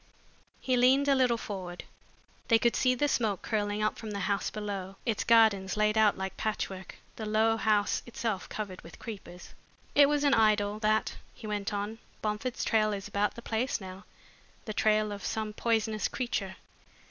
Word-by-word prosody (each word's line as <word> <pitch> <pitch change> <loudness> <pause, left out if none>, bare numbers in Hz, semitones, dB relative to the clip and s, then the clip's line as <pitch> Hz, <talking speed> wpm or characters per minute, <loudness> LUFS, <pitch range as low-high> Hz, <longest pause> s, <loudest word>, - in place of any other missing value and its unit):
He 255 - 0
leaned 265 +3 +4
a 280 - +5
little 255 -3 +3
forward. 185 -5 -6 0.6
They 230 - +6
could 235 +1 +2
see 255 -1 +3
the 290 +4 +1
smoke 220 -8 0
curling 210 -1 -1
up 215 - 0
from 220 - -6
the 200 -1 -4
house 200 +1 0
below, 200 -3 -5
its 225 -4 0
gardens 215 -4 +4
laid 215 0 +2
out 220 -2 +4
like 190 0 -5
patchwork, 190 -3 -3 0.2
the 220 - -4
low 220 +1 +3
house 215 -2 +1
itself 225 -4 -3
covered 200 -4 -5
with 165 - -13
creepers. 195 -5 -9 0.4
"It 285 -1 +6
was 295 0 +1
an 285 -1 +4
idyll, 210 -2 +3
that," 215 0 +1 0.2
he 225 - -11
went 205 -1 -2
on. 205 +2 -3 0.2
"Bomford's 215 +3 -2
trail 215 -1 +2
is 195 -2 -5
about 205 +1 0
the 235 - -9
place 235 +4 -1
now, 190 0 -9 0.6
the 215 - -4
trail 215 0 +2
of 200 -1 -6
some 215 -1 -3
poisonous 220 -1 0
creature. 200 -7 -3
215 Hz, 175 wpm, -30 LUFS, 205-230 Hz, 0.6 s, They